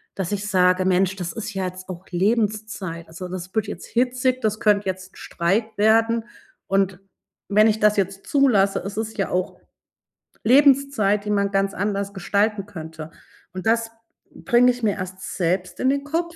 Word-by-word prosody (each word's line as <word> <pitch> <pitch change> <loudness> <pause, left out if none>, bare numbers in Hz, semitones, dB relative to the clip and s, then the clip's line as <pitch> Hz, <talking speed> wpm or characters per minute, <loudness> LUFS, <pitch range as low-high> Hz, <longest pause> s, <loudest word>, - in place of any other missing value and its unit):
dass 190 -2 -3
ich 205 +1 -2
sage: 185 -1 +3
„Mensch, 190 0 +2
das 180 -3 -4
ist 225 0 -6
ja 190 -1 -2
jetzt 185 +1 -7
auch 185 0 -7
Lebenszeit. 205 -3 -1
Also, 180 +3 -8
das 185 0 -7
wird 220 -1 0
jetzt 210 - -7
hitzig, 255 +1 0
das 215 -2 -1
könnt 205 -1 +2
jetzt 185 0 -5
Streit 195 +6 0
werden 225 +2 +3 0.4
und 195 -1 +1 0.5
wenn 215 +2 +6
ich 220 0 +1
das 210 0 +4
jetzt 195 0 -2
zulasse, 225 -9 +3
es 195 +2 -6
ist 220 0 -4
ja 195 - -1
auch 180 +1 -2 0.8
Lebenszeit, 265 -5 +4
die 210 - -5
man 200 -1 +1
ganz 195 0 +1
anders 200 0 -2
gestalten 205 +1 0
könnte.“ 160 -4 -8 0.4
Und, 185 0 -6
das 225 0 +2 0.4
bringe 245 +1 +3
ich 245 -1 -1
mir 215 - +3
erst 185 0 -6
selbst 180 +1 -1
in 260 - +2
den 280 +1 0
Kopf 335 +3 -2
200 Hz, 170 wpm, -23 LUFS, 185-225 Hz, 0.8 s, wenn